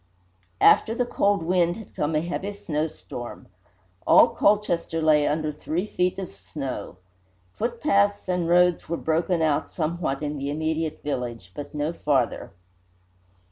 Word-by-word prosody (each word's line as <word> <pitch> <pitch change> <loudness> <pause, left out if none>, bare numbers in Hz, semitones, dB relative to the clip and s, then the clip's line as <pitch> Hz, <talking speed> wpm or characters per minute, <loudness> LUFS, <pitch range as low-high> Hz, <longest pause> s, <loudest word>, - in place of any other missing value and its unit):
After 225 - +5
the 245 - +1
cold 200 -6 +1
wind 175 0 +2
had 220 -1 -11
come 150 +1 -1
a 155 - +2
heavy 180 +4 -4
snowstorm. 155 -9 -5 0.6
All - - +7
Colchester 180 -5 +1
lay 155 -2 +4
under 155 0 0
three 160 +5 -3
feet 180 -3 -1
of 190 -2 -6
snow. 130 - -6 0.6
Footpaths 205 -4 +1
and 180 -2 0
roads 175 -1 +3
were 170 - -1
broken 165 +1 0
out 150 -2 0
somewhat 155 -3 -2
in 145 -1 -3
the 140 +1 -3
immediate 155 +1 -2
village, 120 -9 -4
but 145 +6 -8
no 150 +3 -1
farther. 135 -7 0
160 Hz, 140 wpm, -25 LUFS, 150-180 Hz, 0.6 s, All